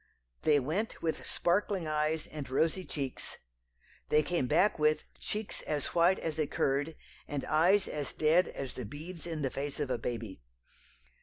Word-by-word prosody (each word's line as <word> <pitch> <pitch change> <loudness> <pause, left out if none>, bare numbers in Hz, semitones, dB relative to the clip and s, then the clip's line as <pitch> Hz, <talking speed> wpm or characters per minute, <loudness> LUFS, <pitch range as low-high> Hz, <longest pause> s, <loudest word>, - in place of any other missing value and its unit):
They 150 -2 +5
went 165 - -2
with 160 -1 -1
sparkling 185 -1 +1
eyes 155 +1 0
and 150 -4 -7
rosy 160 +7 +1
cheeks, 135 -4 -4 0.7
they 150 0 +5
came 170 -5 0
back 170 +6 +3
with 150 0 +3 0.2
"cheeks 210 0 -3
as 150 -2 -2
white 175 +2 +5
as 160 -1 -3
a 155 - +2
curd, 145 +4 0 0.3
and 145 -2 -3
eyes 175 +6 +4
as 145 -3 -3
dead 160 +4 +4
as 135 -2 -5
the 125 - -5
beads 160 - -7
in 160 -3 -3
the 135 - 0
face 140 +1 -3
of 145 -3 -1
a 125 - 0
baby." 115 - -4
155 Hz, 165 wpm, -32 LUFS, 140-170 Hz, 0.7 s, They